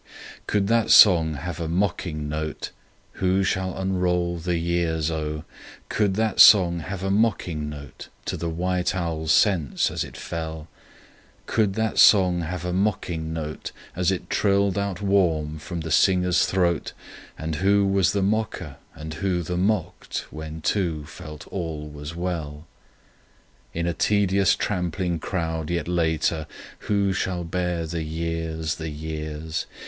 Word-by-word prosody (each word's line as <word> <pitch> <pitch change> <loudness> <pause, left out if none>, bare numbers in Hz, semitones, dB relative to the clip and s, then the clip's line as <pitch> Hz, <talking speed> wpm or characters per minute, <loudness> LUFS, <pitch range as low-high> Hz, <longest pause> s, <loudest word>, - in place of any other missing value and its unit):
Could 105 -2 +1
that 115 +2 +2
song 80 -6 +7
have 85 +3 -5
a 85 - -2
mocking 85 -3 -1
note?— 75 0 -4 0.5
Who 95 +1 +2
shall 95 -1 -1
unroll 90 -2 0
the 85 +1 -1
years 85 -2 0
O!— 75 -1 -3 0.5
Could 100 -3 +1
that 110 -1 0
song 90 -5 +8
have 95 +3 -6
a 95 - 0
mocking 90 -8 0
note 70 -3 -10 0.2
To - - -2
the 85 - -3
white 90 +2 -1
owl's 80 -3 -1
sense 80 - +3
as - - -2
it - - -10
fell? 80 -1 -5 0.8
Could 105 -3 +1
that 110 0 0
song 90 -4 +6
have 90 +1 -4
a 90 - -2
mocking 90 -5 -1
note 75 -2 -5 0.2
As 90 0 +1
it 95 -2 -2
trilled 100 -2 +2
out 100 -1 -2
warm 80 -6 +1
from 85 +1 -5
the 80 0 -5
singer's 90 +1 +3
throat, 85 -4 0 0.4
And 80 -1 -3
who 100 +3 +3
was 95 -1 +3
the 100 -1 0
mocker 95 -8 -2 0.2
and 80 +1 -7
who 90 +1 -1
the 90 +2 -3
mocked 95 0 -1
when 80 +1 -7
two 80 -4 -1
felt 75 0 -10
all 80 -5 -4
was 75 +1 -8
well? 80 -4 -4 1.1
In 85 0 -2
a 85 - 0
tedious 100 0 +2
trampling 90 -2 -2
crowd 80 -3 -3
yet 85 -1 -1
later— 80 -2 0 0.4
Who 100 -2 +2
shall 90 -2 -2
bare 90 0 -2
the 80 +1 -3
years, 80 0 -3
the 80 0 -4
years! 80 +1 -5
85 Hz, 145 wpm, -24 LUFS, 80-95 Hz, 1.1 s, song